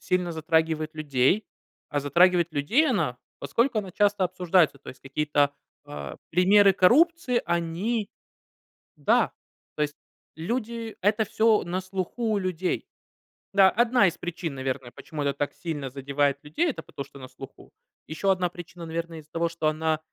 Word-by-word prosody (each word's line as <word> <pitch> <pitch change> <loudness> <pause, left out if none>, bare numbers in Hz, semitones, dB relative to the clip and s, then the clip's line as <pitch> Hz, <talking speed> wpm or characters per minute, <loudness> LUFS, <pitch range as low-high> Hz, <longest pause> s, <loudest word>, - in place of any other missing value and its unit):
сильно 180 -2 0
затрагивает 160 -1 0
людей. 150 +6 +1 0.4
А 145 - -1
затрагивает 170 +3 +3
людей 225 - +2
она, 125 - 0 0.2
поскольку 230 - +1
она 195 -3 -4
часто 205 0 +2
обсуждается. 180 -4 +2
То - - -14
есть 130 - -10
какие-то, 145 +1 +1 0.3
э, 70 -2 -7
примеры 195 +3 +5
коррупции 255 - +4
они 180 +6 -1 0.9
Да, - - +2 0.4
то 150 - -3
есть 150 0 -1 0.4
люди 230 +5 -4
это 210 +3 +2
всё 220 +1 +2
на 175 +2 -2
слуху 190 +5 -3
у 205 - +2
людей. 185 -1 -2 0.7
Да, 195 -1 +6
одна 240 -1 +3
из 170 - -2
причин, 170 -2 -4
наверное, 130 -2 -4
почему 155 -3 -6
это 140 - +1
так 145 +1 -2
сильно 150 -6 -5
задевает 140 +1 0
людей- 155 - 0
это - - -5
потому 140 - -7
что 140 - -15
на 130 - -9
слуху. 135 +1 -13 0.3
Ещё 160 +5 -2
одна 185 -2 +2
причина, 175 0 -10
наверное, 165 0 -5
из-за 150 0 -26
того, 170 0 0
что 165 -2 -2
она, 155 0 0
170 Hz, 155 wpm, -26 LUFS, 150-200 Hz, 0.9 s, Да